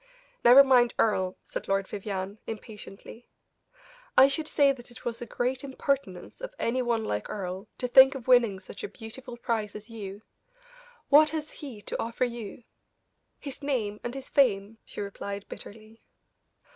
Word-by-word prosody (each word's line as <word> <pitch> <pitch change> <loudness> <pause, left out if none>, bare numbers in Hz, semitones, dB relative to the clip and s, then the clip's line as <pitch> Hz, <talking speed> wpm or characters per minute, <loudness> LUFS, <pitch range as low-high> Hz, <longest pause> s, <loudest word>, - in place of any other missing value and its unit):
"Never 250 +4 +9
mind 250 -3 +4
Earle!" 190 -4 +1
said - - -6
Lord 195 0 +1
Vivianne, 200 0 -5
impatiently; 220 +1 -9 0.9
"I 265 - +9
should 305 +3 -1
say 285 -3 +4
that 250 -3 -8
it 240 - -13
was 235 -1 -3
a 240 - -5
great 250 +4 -2
impertinence 275 - -3
of - - -7
any 255 +2 0
one 235 -3 0
like 105 0 -3
Earle 190 0 -5
to 250 - -2
think 265 +2 +8
of 260 -2 -8
winning 235 -6 +5
such 190 +1 -10
a - - -2
beautiful 240 +4 -10
prize 225 -4 -2
as 210 +2 -10
you. 205 -2 -8 0.9
What 305 +2 +7
has 310 0 -4
he 255 -9 -9
to - - -4
offer 230 +2 -1
you?" 235 -2 -7 0.7
"His 280 -1 -8
name 230 -8 -1
and 240 +2 -4
his 270 0 -7
fame," 220 -5 +2
she - - -7
replied, 200 0 -6
bitterly. 220 +1 -11
230 Hz, 160 wpm, -28 LUFS, 205-265 Hz, 0.9 s, Never